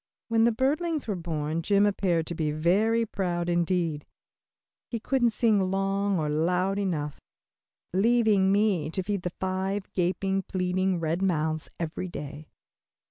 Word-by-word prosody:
When 225 0 +4
the 235 - +4
birdlings 295 +6 0
were 205 - -1
born 160 -2 -2
Jim 200 +4 +3
appeared 185 -5 +1
to 170 - -4
be 155 -2 -1
very 200 +10 +2
proud 175 -4 -2
indeed. 170 -3 0 0.8
He 230 - -4
couldn't 245 +1 +2
sing 215 -4 +2
long 195 +1 0
or 155 -2 -1
loud 180 +6 +1
enough, 150 -7 -2 0.7
leaving 210 -1 +3
me 200 -7 +2
to 185 +3 -3
feed 200 0 -2
the 180 - -2
five 190 +2 -3
gaping, 190 +2 0
pleading 185 0 -1
red 165 +2 -1
mouths 160 -4 0
every 170 +2 -3
day. 150 -2 -8
185 Hz, 140 wpm, -27 LUFS, 165-205 Hz, 0.8 s, When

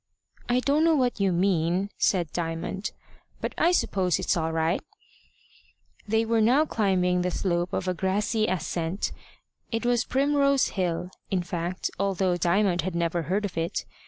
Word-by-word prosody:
"I 245 +1 +3
don't 285 +4 +2
know 330 -1 +4
what 250 -5 +1
you 195 -1 +2
mean," 180 +1 +1
said 175 -5 +1
Diamond, 165 +4 -3 0.5
"but - - -3
I 345 - +3
suppose 185 - +1
it's - - 0
all 160 -1 -1
right." 160 +2 0 1.3
They 220 +2 +2
were 225 0 +2
now 255 +8 +4
climbing 185 -7 +1
the 180 - 0
slope 175 -1 -1
of 185 - -2
a 185 - +1
grassy 210 +4 0
ascent. 175 +1 -2 0.6
It 230 +1 -2
was 240 -1 +2
Primrose 280 0 +2
Hill, 180 -1 -2 0.2
in 185 -2 0
fact, 175 +1 -3
although 190 -2 +1
Diamond 175 +1 +2
had 185 +1 -4
never 170 0 0
heard 195 +6 -1
of 195 - -5
it. 165 +1 -2
185 Hz, 160 wpm, -26 LUFS, 175-220 Hz, 1.3 s, know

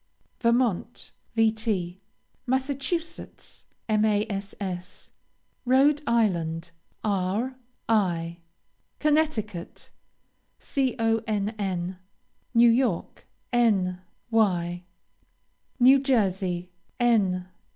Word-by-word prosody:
Vermont, 235 -2 0 0.3
Vt. 220 -5 +1 0.5
Massachusetts, 275 +6 -3 0.2
Mass. 205 -3 -2 0.5
Rhode 275 +4 +4
Island, 170 -8 0 0.3
R. 205 +5 0 0.3
I. 175 -6 +1 0.6
Connecticut, 290 - -1 0.7
Conn. 215 -7 -1 0.6
New 235 0 +7
York, 230 -7 -1 0.3
N. 195 -7 +2 0.3
Y. 175 -5 +1 1.0
New 260 +3 +7
Jersey, 190 -9 0 0.3
N. 195 -7 +2
215 Hz, 55 wpm, -26 LUFS, 185-240 Hz, 1.0 s, New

